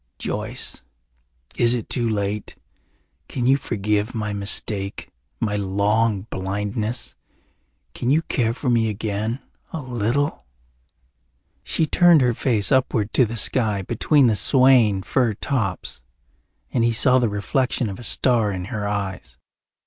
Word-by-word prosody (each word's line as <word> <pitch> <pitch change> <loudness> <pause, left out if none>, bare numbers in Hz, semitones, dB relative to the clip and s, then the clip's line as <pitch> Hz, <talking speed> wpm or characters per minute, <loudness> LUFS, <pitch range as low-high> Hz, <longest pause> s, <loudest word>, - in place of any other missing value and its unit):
"Joyce, - - -4 0.8
is 120 +1 +4
it 120 - -4
too 120 -3 0
late? 105 -1 -3 0.7
Can 125 -3 -3
you 135 +2 +5
forgive 105 -2 -2
my 105 -2 -3
mistake, 100 0 -1 0.3
my 105 -3 -1
long 100 +2 +1
blindness? 105 +5 -3 0.8
Can 120 - -3
you 155 +4 +3
care 115 -6 -1
for 130 - -5
me 115 -2 +2
again 110 +3 -3 0.3
a 160 - -4
little?" 130 +2 -1 1.2
She 160 - 0
turned 170 0 +5
her 125 -2 +2
face 110 -5 0
upward 125 -5 +1
to 130 - +5
the 115 +2 -5
sky 105 -3 +2
between 135 - +2
the 115 -3 +3
swaying 120 -5 +4
fir 120 -3 0
tops 100 - -3 0.7
and 120 - +1
he 115 0 +2
saw 130 +3 +4
the 120 -3 +1
reflection 120 +4 -1
of 100 +1 -6
a - - -9
star 115 -2 +2
in 90 -2 -4
her 105 -2 -2
eyes. 95 -11 -4
110 Hz, 135 wpm, -22 LUFS, 100-125 Hz, 1.2 s, you